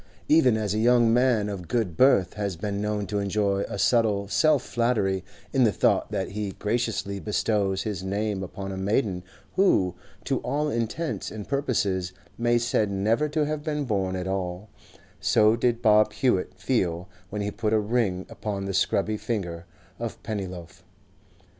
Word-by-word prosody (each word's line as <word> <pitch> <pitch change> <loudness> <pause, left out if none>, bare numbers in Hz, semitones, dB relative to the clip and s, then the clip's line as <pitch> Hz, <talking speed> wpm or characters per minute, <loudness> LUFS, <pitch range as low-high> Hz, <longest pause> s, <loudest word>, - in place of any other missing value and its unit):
Even 130 -7 +5
as 105 -2 -1
a 110 - 0
young 120 0 +4
man 120 -4 +3
of 95 -4 -5
good 110 -9 -1
birth 100 - +4
has 100 -3 -3
been 100 +3 -3
known 105 -1 -1
to 105 +1 -2
enjoy 100 0 0
a - - -4
subtle 105 -3 +2
self 150 +7 +3
flattery 110 -6 0 0.3
in 135 -2 +4
the 110 - +4
thought - - +2
that - - -2
he 100 -1 -4
graciously 105 -2 -2
bestows 100 -2 0
his 100 -4 -4
name 100 +1 -2
upon 95 +1 -6
a 95 - -5
maiden 95 -1 0 0.3
who, 100 - +3 0.3
to - - 0
all 150 +1 -1
intents 120 +7 -2
and 105 -2 -7
purposes, 100 -10 0 0.2
may 120 0 +1
be - - +5
said 115 -3 +1
never 110 +9 +1
to 150 0 +1
have 150 0 -2
been 150 -2 -2
born 95 -5 -1
at 90 -1 -3
all, 95 +1 -3 0.5
so 110 +1 +4
did 120 0 0
Bob 105 -1 +5
Hewett 120 -9 0
feel 95 -4 -1 0.2
when 105 0 -3
he 105 - -2
put 105 0 -2
a 110 - +4
ring 105 -4 0
upon 100 -2 -4
the 100 - -3
scrubby 105 +2 +1
finger 85 -8 -4 0.3
of 115 -1 -4
Pennyloaf. 95 -5 -6
105 Hz, 170 wpm, -26 LUFS, 95-120 Hz, 0.5 s, Even